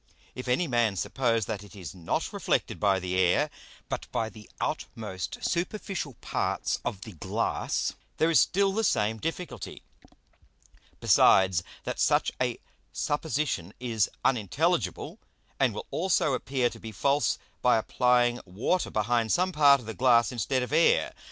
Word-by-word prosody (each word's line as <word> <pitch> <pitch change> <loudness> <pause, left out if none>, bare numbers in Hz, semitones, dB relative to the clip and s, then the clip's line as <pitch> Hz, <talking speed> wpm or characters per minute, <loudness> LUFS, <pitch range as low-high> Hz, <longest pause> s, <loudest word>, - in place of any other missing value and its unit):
If 125 0 -7
any 125 +8 +2
Man 120 -6 +1
suppose 115 +2 0
that 105 -3 -4
it 105 - -14
is 90 -6 -8
not 85 -3 -3
reflected - - -1
by 100 -2 +3
the 90 0 -1
Air, 90 -1 +3 0.4
but - - -5
by 110 -1 -1
the 110 -1 -14
outmost 95 - -4
superficial 175 - -3
parts - - -1
of 95 - -4
the 110 - -8
Glass, 80 - -2 0.2
there 160 +1 +3
is 155 - +6
still 195 +1 +2
the 225 +2 0
same 110 - +1
difficulty: 165 +4 -5 1.2
Besides, 95 -3 +5 0.2
that - - -4
such - - +3
a - - 0 0.3
Supposition 145 - -2
is 115 -5 0 0.2
unintelligible, 110 -8 0 0.4
and - - +3
will - - -6
also 170 -5 +1
appear 130 -1 0
to - - -11
be 115 - -8
false 140 +8 +1 0.2
by 125 -2 +4
applying 120 +1 +2
Water 105 - -1
behind 115 +1 0
some 185 +1 +2
part 145 -4 +6
of 120 - -12
the 110 - -5
Glass 120 -2 +4
instead 125 +2 0
of 125 - -5
Air. 165 +2 +3
120 Hz, 150 wpm, -28 LUFS, 105-145 Hz, 1.2 s, is